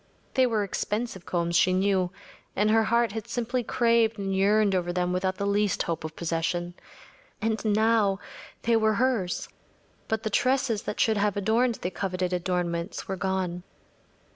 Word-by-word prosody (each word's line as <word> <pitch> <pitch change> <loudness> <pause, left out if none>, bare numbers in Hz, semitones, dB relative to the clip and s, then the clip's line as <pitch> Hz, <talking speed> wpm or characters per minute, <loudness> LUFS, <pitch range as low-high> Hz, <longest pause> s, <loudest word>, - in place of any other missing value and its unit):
They 260 -1 +4
were 220 -3 +1
expensive 210 0 -3
combs, 170 -1 -1
she 185 - +4
knew, 190 -1 +2 0.5
and 210 +2 +2
her 225 0 +4
heart 235 0 +2
had 220 +1 -5
simply 240 +1 -2
craved 230 -1 +2
and 195 -1 -2
yearned 205 +1 +3
over 175 -1 0
them 180 0 0
without 185 +1 0
the 200 - -2
least 200 -1 +1
hope 165 -1 -3
of 160 0 -6
possession. 175 +1 -2 0.7
And 220 0 -1
now, 215 -2 +3 0.5
they 235 0 +3
were 220 -1 +3
hers, 230 -7 0 0.6
but 220 0 -1
the 220 - -2
tresses 255 -2 +1
that - - -5
should 220 -1 +3
have 205 -1 +1
adorned 230 +4 +2
the 180 - -4
coveted 185 -1 -2
adornments 175 0 -2
were 195 - -2
gone. 185 -2 -2
200 Hz, 165 wpm, -27 LUFS, 180-225 Hz, 0.7 s, They